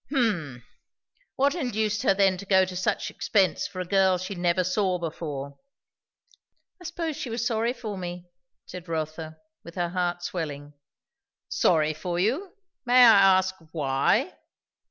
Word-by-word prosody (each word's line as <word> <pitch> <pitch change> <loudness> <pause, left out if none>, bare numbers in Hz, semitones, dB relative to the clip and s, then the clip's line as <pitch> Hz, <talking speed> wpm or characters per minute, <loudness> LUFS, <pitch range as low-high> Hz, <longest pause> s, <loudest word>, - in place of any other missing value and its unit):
"H'm! 175 - -1 0.7
What 280 +1 +2
induced 220 - -1
her 195 - +3
then 195 -1 +3
to 200 - -8
go 190 -1 +4
to 185 0 -8
such 185 - -1
expense 190 -6 +1
for 185 - -9
a 185 - -3
girl 190 0 +3
she 185 +2 -5
never 175 0 +1
saw 185 0 0
before?" 150 -4 -6 1.2
"I - - -12
suppose 330 -2 -3
she 255 - -5
was 230 +1 -2
sorry 230 0 0
for 220 -6 -6
me," 175 0 -6 0.4
said 180 -1 -10
Rotha, 160 0 -4 0.3
with 170 - -12
her 175 -2 -1
heart 175 -1 -2
swelling. 150 -6 -5 0.8
"Sorry 155 -2 +2
for 175 +3 -4
you! 275 - -1 0.3
May 245 0 +1
I 195 -4 +7
ask, 185 0 -1 0.2
why?" 135 -4 0
185 Hz, 150 wpm, -26 LUFS, 165-215 Hz, 1.2 s, I